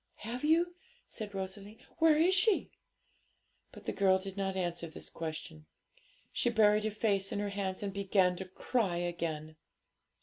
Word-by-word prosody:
'Have 240 Hz, +4 st, -5 dB
you?' 335 Hz, +3 st, +3 dB, 0.3 s
said 210 Hz, -3 st, -6 dB
Rosalie; 195 Hz, +3 st, -5 dB, 0.2 s
'where 320 Hz, -2 st, +6 dB
is 345 Hz, +4 st, +4 dB
she?' 385 Hz, +2 st, +3 dB, 1.0 s
But -, -, -13 dB
the -, -, -1 dB
girl 190 Hz, -1 st, +4 dB
did 190 Hz, 0 st, -7 dB
not 195 Hz, -1 st, -1 dB
answer 175 Hz, -2 st, -2 dB
this 160 Hz, -, -9 dB
question; 155 Hz, -1 st, -6 dB, 0.6 s
she 240 Hz, -, +1 dB
buried 215 Hz, -2 st, +4 dB
her -, -, +2 dB
face 200 Hz, -2 st, 0 dB
in -, -, -2 dB
her 205 Hz, 0 st, -1 dB
hands 195 Hz, -1 st, -3 dB
and 200 Hz, -1 st, -3 dB
began 190 Hz, -2 st, +2 dB
to 190 Hz, -, -5 dB
cry 190 Hz, 0 st, -1 dB
again. 165 Hz, -3 st, -3 dB
195 Hz, 160 wpm, -32 LUFS, 180-220 Hz, 1.0 s, where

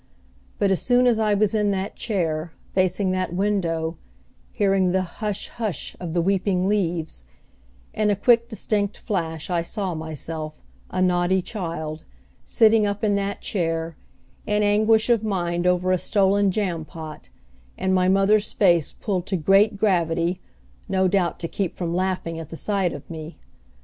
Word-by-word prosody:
But 200 Hz, -1 st, +2 dB
as 190 Hz, -, +1 dB
soon 245 Hz, 0 st, +3 dB
as 235 Hz, -3 st, +3 dB
I 215 Hz, -2 st, +2 dB
was 205 Hz, 0 st, +2 dB
in 210 Hz, -1 st, +2 dB
that 195 Hz, +1 st, -2 dB
chair, 165 Hz, -6 st, -2 dB, 0.2 s
facing 185 Hz, +1 st, +1 dB
that 185 Hz, -2 st, -2 dB
window, 170 Hz, -5 st, 0 dB, 0.6 s
hearing 195 Hz, -3 st, +2 dB
the 190 Hz, 0 st, +2 dB
"Hush, 205 Hz, +3 st, -4 dB
hush," 215 Hz, -, -4 dB
of 175 Hz, -2 st, -5 dB
the 170 Hz, -, +2 dB
weeping 190 Hz, 0 st, +1 dB
leaves, 170 Hz, -, -1 dB, 0.7 s
in 215 Hz, -1 st, +1 dB
a 205 Hz, -, +3 dB
quick 235 Hz, +3 st, +3 dB
distinct 205 Hz, -2 st, -1 dB
flash 165 Hz, -5 st, -3 dB
I 170 Hz, -1 st, +1 dB
saw 190 Hz, +1 st, -3 dB
myself, 155 Hz, -1 st, -6 dB, 0.3 s
a 185 Hz, -, 0 dB
naughty 180 Hz, +1 st, +2 dB
child, 165 Hz, -6 st, -5 dB, 0.4 s
sitting 220 Hz, -2 st, +4 dB
up 205 Hz, +2 st, -3 dB
in 210 Hz, -1 st, +3 dB
that 200 Hz, 0 st, -3 dB
chair, 165 Hz, -3 st, -2 dB, 0.5 s
in 210 Hz, 0 st, +2 dB
anguish 215 Hz, +2 st, +3 dB
of 235 Hz, -3 st, +3 dB
mind 175 Hz, -4 st, -1 dB
over 180 Hz, 0 st, +2 dB
a 185 Hz, -, +2 dB
stolen 200 Hz, +1 st, +2 dB
jam 180 Hz, -5 st, -1 dB
pot, 155 Hz, -1 st, -9 dB, 0.5 s
and 190 Hz, 0 st, 0 dB
my 185 Hz, 0 st, +3 dB
mother's 200 Hz, +2 st, +3 dB
face 175 Hz, -6 st, +3 dB
pulled 190 Hz, -3 st, -3 dB
to 190 Hz, -, 0 dB
great 195 Hz, +5 st, +4 dB
gravity, 175 Hz, -3 st, +1 dB, 0.5 s
no 190 Hz, -1 st, +2 dB
doubt 185 Hz, -2 st, +1 dB
to 165 Hz, -, -2 dB
keep 190 Hz, 0 st, -3 dB
from 170 Hz, -2 st, -3 dB
laughing 180 Hz, -2 st, -2 dB
at 160 Hz, -, -8 dB
the 165 Hz, -, -7 dB
sight 195 Hz, -3 st, 0 dB
of 145 Hz, -, -9 dB
me. 160 Hz, 0 st, -8 dB
185 Hz, 160 wpm, -23 LUFS, 170-205 Hz, 0.7 s, sitting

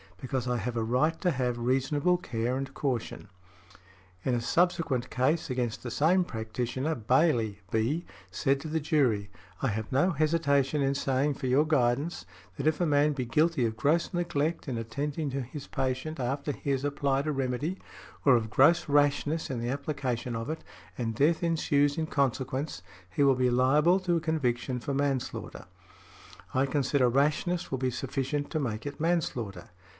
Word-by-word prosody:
Because 130 Hz, +1 st, -3 dB
I 125 Hz, 0 st, +1 dB
have 120 Hz, +2 st, -3 dB
a 115 Hz, -, +1 dB
right 130 Hz, +8 st, +1 dB
to 180 Hz, -, +2 dB
have 125 Hz, -4 st, -1 dB
reasonable 135 Hz, +8 st, +1 dB
care 120 Hz, -6 st, -2 dB
and 135 Hz, 0 st, -3 dB
caution." 125 Hz, -6 st, -3 dB, 1.0 s
In 130 Hz, -, 0 dB
a 120 Hz, -, -1 dB
subsequent 160 Hz, -2 st, +1 dB
case 145 Hz, +6 st, +1 dB
against 125 Hz, -3 st, -2 dB
the 120 Hz, -, -5 dB
same 175 Hz, +9 st, +3 dB
practitioner, 120 Hz, +4 st, -3 dB
Bayley, 115 Hz, -3 st, +2 dB
B., 125 Hz, +10 st, 0 dB, 0.3 s
said 135 Hz, -2 st, +1 dB
to 160 Hz, -, -6 dB
the 160 Hz, +1 st, -1 dB
jury, 130 Hz, -10 st, +1 dB, 0.3 s
"I -, -, +3 dB
have 110 Hz, +1 st, -4 dB
no 145 Hz, +8 st, +3 dB
hesitation 150 Hz, -3 st, +2 dB
in 135 Hz, 0 st, +2 dB
saying 135 Hz, +1 st, +1 dB
for 130 Hz, -, -4 dB
your 135 Hz, +5 st, +4 dB
guidance, 145 Hz, +2 st, +1 dB, 0.3 s
that 140 Hz, +1 st, -1 dB
if 155 Hz, -1 st, +2 dB
a -, -, +3 dB
man 150 Hz, -1 st, +3 dB
be 130 Hz, -3 st, -3 dB
guilty 150 Hz, +2 st, +2 dB
of 110 Hz, -1 st, -2 dB
gross 155 Hz, +11 st, +1 dB
neglect 165 Hz, -2 st, -1 dB
in 125 Hz, -3 st, -2 dB
attending 140 Hz, +6 st, -3 dB
to 135 Hz, +1 st, -2 dB
his 130 Hz, +3 st, -7 dB
patient 135 Hz, +3 st, -2 dB
after 140 Hz, +4 st, -1 dB
he 140 Hz, -, -6 dB
has 135 Hz, -1 st, 0 dB
applied 140 Hz, -1 st, 0 dB
a -, -, +1 dB
remedy, 135 Hz, +6 st, -2 dB, 0.4 s
or 135 Hz, -3 st, +6 dB
of 110 Hz, -2 st, -1 dB
gross 165 Hz, +8 st, +5 dB
rashness 145 Hz, +2 st, +2 dB
in 130 Hz, -3 st, -3 dB
the 120 Hz, +1 st, -2 dB
application 130 Hz, -4 st, -2 dB
of 115 Hz, +3 st, -4 dB
it, 160 Hz, -, -6 dB, 0.4 s
and 115 Hz, -2 st, -2 dB
death 155 Hz, +8 st, +2 dB
ensues 145 Hz, -3 st, +2 dB
in 160 Hz, -, 0 dB
consequence, 135 Hz, -, -1 dB, 0.3 s
he 95 Hz, +10 st, +1 dB
will 135 Hz, -1 st, +5 dB
be 125 Hz, 0 st, +2 dB
liable 150 Hz, +9 st, +4 dB
to 180 Hz, -2 st, 0 dB
a -, -, +2 dB
conviction 130 Hz, -6 st, -1 dB
for 140 Hz, +4 st, -3 dB
manslaughter." 135 Hz, -2 st, -2 dB, 0.9 s
"I 130 Hz, +1 st, +3 dB
consider 135 Hz, -2 st, +2 dB
rashness 150 Hz, +7 st, +1 dB
will 130 Hz, -, -1 dB
be 130 Hz, 0 st, 0 dB
sufficient 135 Hz, +3 st, -2 dB
to 155 Hz, -, 0 dB
make 115 Hz, -5 st, -3 dB
it 145 Hz, +1 st, -7 dB
manslaughter. 130 Hz, -, -1 dB
135 Hz, 175 wpm, -29 LUFS, 125-155 Hz, 1.0 s, or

